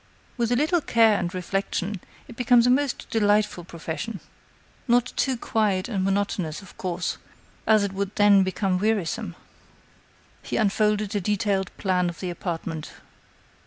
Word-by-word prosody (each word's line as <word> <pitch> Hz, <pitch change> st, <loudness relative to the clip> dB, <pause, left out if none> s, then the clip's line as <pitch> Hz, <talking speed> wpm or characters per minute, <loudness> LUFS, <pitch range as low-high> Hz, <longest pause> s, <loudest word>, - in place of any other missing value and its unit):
With 235 Hz, -1 st, 0 dB
a -, -, +4 dB
little 315 Hz, +6 st, +2 dB
care 225 Hz, -5 st, +4 dB
and 175 Hz, -1 st, -2 dB
reflection, 190 Hz, +1 st, -2 dB, 0.3 s
it 240 Hz, -, -11 dB
becomes 245 Hz, -1 st, +4 dB
a 250 Hz, -, +5 dB
most 275 Hz, 0 st, 0 dB
delightful 205 Hz, -4 st, +2 dB
profession. 170 Hz, +5 st, -5 dB, 0.7 s
Not 245 Hz, +1 st, +2 dB
too 265 Hz, -2 st, +1 dB
quiet 210 Hz, -5 st, 0 dB
and 200 Hz, -6 st, -1 dB
monotonous, 195 Hz, -3 st, -1 dB
of 195 Hz, -, -15 dB
course, 180 Hz, -1 st, -3 dB, 0.5 s
as 215 Hz, -2 st, +5 dB
it 200 Hz, -1 st, -2 dB
would 200 Hz, +1 st, -3 dB
then 205 Hz, -1 st, +6 dB
become 190 Hz, 0 st, 0 dB
wearisome." 210 Hz, -4 st, -1 dB, 1.1 s
He -, -, -3 dB
unfolded 210 Hz, -1 st, +1 dB
a 205 Hz, -, +1 dB
detailed 200 Hz, -1 st, 0 dB
plan 180 Hz, -2 st, +1 dB
of 170 Hz, -, -9 dB
the 180 Hz, -2 st, -3 dB
apartment. 165 Hz, -3 st, -5 dB
200 Hz, 145 wpm, -25 LUFS, 185-225 Hz, 1.1 s, then